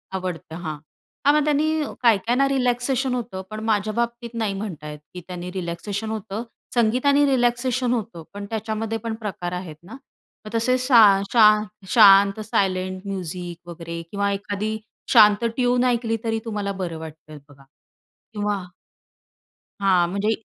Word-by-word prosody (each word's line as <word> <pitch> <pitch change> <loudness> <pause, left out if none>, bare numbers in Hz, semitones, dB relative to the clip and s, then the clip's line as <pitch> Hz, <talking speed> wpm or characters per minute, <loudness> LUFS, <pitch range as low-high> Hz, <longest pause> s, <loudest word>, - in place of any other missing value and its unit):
आवडतं 180 -4 -5
हां. 155 -3 -5 0.5
हां, 285 - +6
मग 300 - +3
त्यांनी 305 +1 +1 0.2
काही 230 -4 +5
काहींना 245 +7 +1
रिलॅक्सेशन 255 0 0
होतं. 230 -6 -5
पण 215 0 -6
माझ्या 215 -1 0
बाबतीत 235 0 -3
नाही 200 -2 -1
म्हणता 180 -7 -6
येत 150 - -9
की 180 - -7
त्यांनी 180 0 -6
रिलॅक्सेशन 195 +4 -4
होतं, 215 +1 -4 0.3
संगीताने 255 +5 +3
रिलॅक्सेशन 250 -1 +1
होतं, 210 -8 -4
पण 200 0 -6
त्याच्यामध्ये 220 0 -3
पण 225 0 -4
प्रकार 195 -5 -5
आहेत 180 -3 -6
ना. 200 - -12 0.5
मग - - -7
तसे 255 +3 +2
साय 225 -7 +6
शां 215 -2 +6 0.3
शांत 200 -2 +7
सायलेंट 185 -2 -1
म्युझिक 175 -2 -6
वगैरे 170 0 -6
किंवा 200 0 0
एखादी 205 +2 -3 0.4
शांत 210 -1 +6
ट्यून 245 -1 +2
ऐकली 235 -2 +1
तरी 225 -1 -1
तुम्हाला 205 -3 -3
बरं 165 -2 -4
वाटतंय 155 -1 -10
बघा. 140 -1 -18 0.7
किंवा 205 -2 -1 1.2
हां, 185 -3 +3
म्हणजे 200 +3 0
210 Hz, 145 wpm, -23 LUFS, 185-235 Hz, 1.2 s, शांत